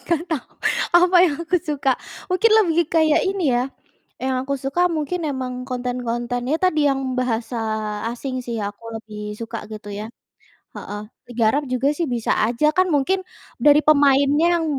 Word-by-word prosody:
Nggak 335 -2 +1
tau. 300 -6 -2 0.5
Apa 360 +1 +5
yang 320 -5 +1
aku 340 +2 +1
suka. 295 -5 -1 0.4
Mungkin 370 +5 +3
lebih 335 0 +2
kayak 315 -2 +4
ini, 390 -2 -1
ya. 245 +1 +2 0.6
Yang 260 0 -1
aku 280 +1 -2
suka 270 +6 -2
mungkin 325 +2 -2
emang 255 -2 -4
konten-konten, 245 -1 -2
ya 310 - +3
tadi, 350 -3 +2
yang 270 0 -1
bahasa 245 -1 -2 0.5
asing, 255 +2 -5
sih, 235 -2 -4
yang 200 - -2
aku - - -34 0.2
lebih 215 -1 -11 0.2
suka, 230 0 -5
gitu, 210 -1 -8
ya. 210 +1 -5 0.7
Heeh. 205 0 -6 0.3
Liga 240 -1 -1
Arab 285 +6 0
juga, 255 +2 +1
sih, 345 - 0
bisa 240 -5 -1
aja. 235 +6 0
Kan, 370 0 +4
mungkin, 345 +7 +1 0.4
dari 295 0 +7
pemainnya 285 +1 +4
yang 325 - -1
270 Hz, 165 wpm, -21 LUFS, 245-320 Hz, 0.7 s, dari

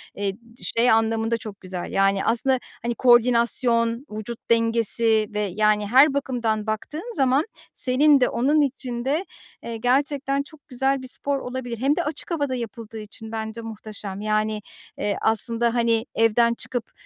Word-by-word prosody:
eee, 200 -1 -2
d 235 +3 -17
şey 235 +2 +2
anlamında 225 +1 +1
çok 210 -3 -9
güzel. 185 -1 -6
Yani, 195 0 +2
aslında, 250 +3 +2 0.2
hani, 235 0 -2
koordinasyon, 235 0 +3
vücut 215 +2 -6
dengesi 230 -1 +2
ve, 210 - -2
yani, 210 +1 +1
her 270 +5 +6
bakımdan 235 -6 -1
baktığın 305 - -5
zaman 270 +1 +2 0.3
senin 280 +3 +4
de - - +4
onun 290 +5 +2
için 250 -3 -3
de, 305 +8 0 0.4
eee, 230 -1 -5
gerçekten 275 +3 0
çok 305 -1 -16
güzel 270 +1 0
bir 260 - -8
spor 280 +2 -1
olabilir. 250 -2 -5
Hem 275 +6 +1
de 350 - -1
açık 305 +3 -5
havada 285 -5 -1
yapıldığı 225 -1 -7
için 220 +1 -9
bence 220 +1 -4
muhteşem. 210 -3 -7
Yani, 215 0 0 0.4
eee, 205 -1 -1
aslında, 230 +1 +4
hani, 230 -1 +1
evden 230 +1 +3
çıkıp, 235 0 -4
235 Hz, 155 wpm, -23 LUFS, 220-260 Hz, 0.4 s, her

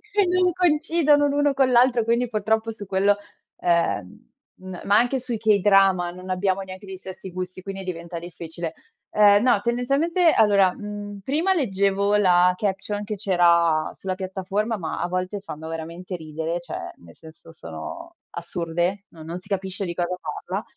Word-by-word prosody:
e 405 -2 +4
non 360 0 +2
coincidono 305 -3 +3
l'uno 290 0 +2
con 265 -1 +3
l'altro, 245 -2 +4
quindi 235 +1 +1
purtroppo 220 +1 0
su 210 -2 -9
quello, 195 +2 +2 0.4
ehm, 170 - 0 0.3
n 185 -2 -8
ma 200 +1 +3
anche 245 +2 +2
sui 245 -2 -4
k-drama 195 -4 +4
non 185 +1 -10
abbiamo 190 +1 0
neanche 190 +1 -9
gli 190 - -6
stessi 190 0 -9
gusti, 185 +1 -6
quindi 195 0 -6
diventa 170 -2 -6
difficile. 170 -1 -7 0.4
Ehm, 205 +1 +5
no, 245 -5 +4
tendenzialmente 280 - +2
allora, 200 -6 +4
mhmm, 205 -1 -7
prima 315 - +1
leggevo 200 - +1
la 180 -3 +5
caption 205 +1 -2
che 210 +1 -4
c'era 170 -5 +3
sulla 190 -1 -4
piattaforma, 195 +4 -2
ma 160 -4 -4
a 175 - -1
volte 185 +2 -3
fanno 160 -5 -8
veramente 165 +3 -6
ridere, 160 +1 -4
cioè 170 -2 -7
nel 85 -1 -17
senso 160 0 -15
sono 340 - -9 0.2
assurde, 170 +3 -2
no 160 -2 -13
non 165 +2 -5
si 185 - -20
capisce 195 0 -3
di 175 -2 -3
cosa 175 +1 -2
parla. 415 +2 -4
195 Hz, 160 wpm, -24 LUFS, 175-225 Hz, 0.4 s, Ehm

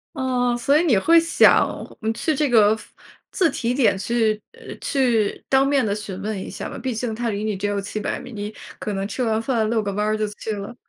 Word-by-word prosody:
哦， 250 -3 0
所 280 +4 +3
以 - - +2
你 255 - +4
会 330 +12 +5
想， 330 0 +5 0.3
呃， 220 0 -1
去 315 +7 -1
这 295 -1 0
个 215 -3 +5
服 - - -16 0.4
自 355 -5 +2
提 245 -2 -1
点 250 -7 +3
去， 215 +1 0
呃， 470 0 -10
去 240 -7 0
当 270 0 +4
面 275 -3 +2
地 200 - 0
询 205 -3 -6
问 210 -1 -3
一 - - -7
下 - - -6
吗？ - - -7
毕 255 -3 -3
竟 230 0 -2
它 235 +1 -2
离 205 -1 -3
你 215 -2 -2
只 200 +2 -2
有 205 -1 -1
700 210 +2 -3
米， 250 - -10
你 210 -2 -5 0.3
可 210 - -3
能 195 0 -2
吃 235 - -4
完 220 -1 +1
饭 225 -3 0
遛 225 -1 +1
个 200 - -2
弯 210 +2 -1
儿 215 0 +1
就 215 - 0
去 210 +1 -5
了。 205 +3 -6
225 Hz, 255 characters per minute, -22 LUFS, 210-260 Hz, 0.4 s, 会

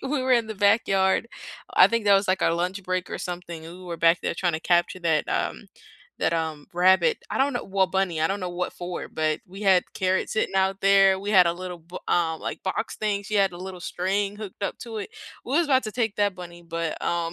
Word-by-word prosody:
we 270 0 -1
were 255 0 +2
in 235 -2 +3
the 220 - -4
backyard, 200 0 +2 0.5
I - - +8
think 230 -1 -1
that 200 - +7
was, 195 +1 +2
like, 190 +1 +2
our 165 - +3
lunch 180 +3 -2
break 185 0 -2
or - - -4
something, 175 -2 -6
and 175 +2 -10
we 185 - -12
were 170 -1 -5
back 165 +1 +4
there - - -1
trying 175 -2 0
to 160 - -3
capture 175 +1 +1
that, 160 -3 +1
um - - -2 0.5
that, 170 - +1
um, 160 -3 -3
rabbit, 190 - +4
I - - -2
don't 275 0 +2
know 245 - -3
well 195 0 +1
bunny, 185 -4 -1
I 160 - +3
don't 200 +1 -2
know 180 -1 -3
what 180 +1 -3
for, 175 0 -6
but 155 -1 -1
we 195 +3 -10
had 190 -3 +4
carrots 190 0 0
sitting 220 - 0
out 190 +1 +1
there, 195 -1 +5
we 200 +2 -4
had 185 -4 +6
a 170 - +2
little 180 0 -7
bo 170 +3 -10
um, 160 -2 +1
like, - - -5
box 190 +4 -3
thing, 205 -2 -1
she 210 +1 -3
had 195 -2 +3
a - - -8
little 185 0 -7
string 195 +4 -2
hooked 210 -2 -9
up - - -2
to 230 -2 -6
it, 205 - -5 0.4
we 260 - -4
was 340 - +4
about 265 -2 +3
to 215 - -3
take 225 -4 -1
that 205 -2 +1
bunny, 175 -1 -10
but, 165 -1 -4
um 170 -1 -1
190 Hz, 250 wpm, -25 LUFS, 175-200 Hz, 0.5 s, I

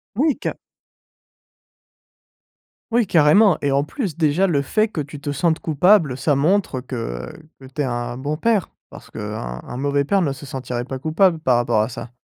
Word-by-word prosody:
Oui, 285 +4 +2
ca - - -4 2.3
Oui, 235 -2 +2
carrément 175 +4 +5
et 145 - 0
en 140 +1 +2
plus, 190 - -4
déjà 165 +4 +2
le 145 -6 +1
fait 215 +10 +1
que 165 -8 -3
tu 145 0 -10
te 145 - -4
sentes 160 +3 +1
coupable, 160 -3 +3
ça 145 +3 +1
montre 155 -2 +1
que 115 - -5 0.3
que 130 - -12
tu 145 +3 -4
es - - -1
un 120 -1 -3
bon 145 +3 -3
père. 220 -2 +1 0.2
Parce - - -13
qu'un 105 - -6
un - - -8
mauvais 140 +1 0
père 195 +5 +2
ne 140 -4 0
se 140 +1 -10
sentirait 125 -2 -4
pas 135 -1 -5
coupable 165 +4 +2
par 130 -6 +2
rapport 115 -3 +2
à 110 - -2
ça. 120 0 -8
145 Hz, 185 wpm, -21 LUFS, 130-180 Hz, 2.3 s, carrément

